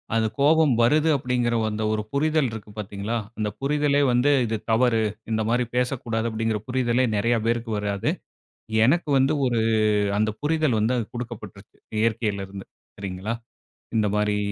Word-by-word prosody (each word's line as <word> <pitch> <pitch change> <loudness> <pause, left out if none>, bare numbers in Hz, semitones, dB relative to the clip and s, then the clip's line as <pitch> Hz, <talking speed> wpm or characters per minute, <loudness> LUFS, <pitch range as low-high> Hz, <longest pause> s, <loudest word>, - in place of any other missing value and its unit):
அந்த 110 -1 +2
கோபம் 150 -1 +4
வருது 150 +7 +4
அப்படிங்கிற 125 -2 0
அந்த 110 0 -3
ஒரு 110 0 0
புரிதல் 155 -2 +2
இருக்கு 105 -1 -8
பாத்தீங்களா, 105 +3 -3 0.2
அந்த 105 -1 -1
புரிதலே 145 +1 +2
வந்து 125 +4 +3
இது 110 0 -1
தவறு, 115 -1 +3 0.3
இந்த 110 0 +1
மாரி 120 +1 +2
பேசக்கூடாது 120 -3 -1
அப்படிங்கிற 110 -1 -1
புரிதலே 125 0 +1
நெறைய 115 +3 +2
பேருக்கு 115 -1 -1
வராது, 100 -1 -1 0.7
எனக்கு 155 +3 +2
வந்து 135 +3 +3
ஒரு 120 -2 +1 0.6
அந்த 110 +1 +2
புரிதல் 150 -6 +1
வந்து 115 +4 +1 0.2
குடுக்கப்பட்டுருச்சு 105 -5 -8 0.2
இயற்கையிலிருந்து 100 -4 -2 0.3
சரிங்களா, 100 +3 -4 0.6
இந்த 105 -1 +2
மாரி 105 0 +1
115 Hz, 135 wpm, -24 LUFS, 110-130 Hz, 0.7 s, கோபம்